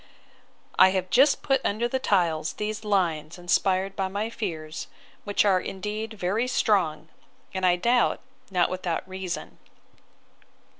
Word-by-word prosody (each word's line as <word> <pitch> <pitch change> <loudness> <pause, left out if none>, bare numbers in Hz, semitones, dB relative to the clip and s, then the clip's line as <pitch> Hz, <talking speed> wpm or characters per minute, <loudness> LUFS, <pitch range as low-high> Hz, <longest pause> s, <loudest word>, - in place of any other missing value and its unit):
I 190 - +9
have 185 0 -3
just 270 +6 +4
put 270 -2 +2
under 220 +4 0
the 260 +2 -1
tiles 165 -9 +1
these 215 +1 -4
lines 170 -6 0
inspired 190 +2 +1
by 195 -1 -1
my 205 +4 -3
fears, 160 -8 -5 0.4
which 205 0 +2
are 190 -2 +4
indeed 210 +3 -5
very 205 +5 0
strong; 190 -10 +1 0.4
and, 185 -1 +1
I 175 - +5
doubt, 235 +7 +2 0.3
not 180 -3 +1
without 180 -1 -3
reason. 185 -2 -6
190 Hz, 135 wpm, -26 LUFS, 180-215 Hz, 0.4 s, I